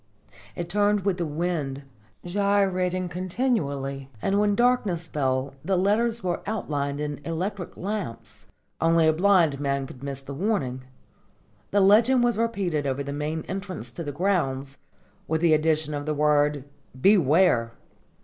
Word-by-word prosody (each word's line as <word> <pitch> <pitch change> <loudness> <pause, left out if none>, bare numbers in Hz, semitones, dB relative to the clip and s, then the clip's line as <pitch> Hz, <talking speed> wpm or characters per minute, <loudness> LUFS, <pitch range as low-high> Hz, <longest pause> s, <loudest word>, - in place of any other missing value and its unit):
It 170 - -4
turned 205 +2 +2
with 190 -1 0
the 170 - -1
wind, 150 -3 -2 0.4
gyrating 185 -1 +1
continually, 165 - -2
and 195 - +1
when 205 -1 +2
darkness 215 -8 +1
fell 135 -3 -1
the 190 +3 +1
letters 220 +4 +1
were 175 -2 -1
outlined 145 -9 -2
in 150 -1 -4
electric 180 +4 -4
lamps. 115 - -5 0.3
Only 165 0 +4
a 160 - +4
blind 170 -5 +3
man 140 -1 -1
could 130 -1 -12
miss 140 -1 -5
the 140 - -7
warning. 135 - -2 0.8
This 200 -1 +3
legend 230 +6 +5
was 240 -3 +1
repeated 190 -11 -1
over 135 +1 -1
the 140 0 -5
main 150 +2 -3
entrance 190 - -5
to 170 - -6
the 145 - -4
grounds, 140 -5 -1 0.5
with 160 0 0
the 170 -2 +4
addition 155 -1 +1
of 145 0 -4
the 155 - 0
word 150 -1 +2 0.4
"Beware!" 155 - +4
165 Hz, 145 wpm, -25 LUFS, 140-195 Hz, 0.8 s, legend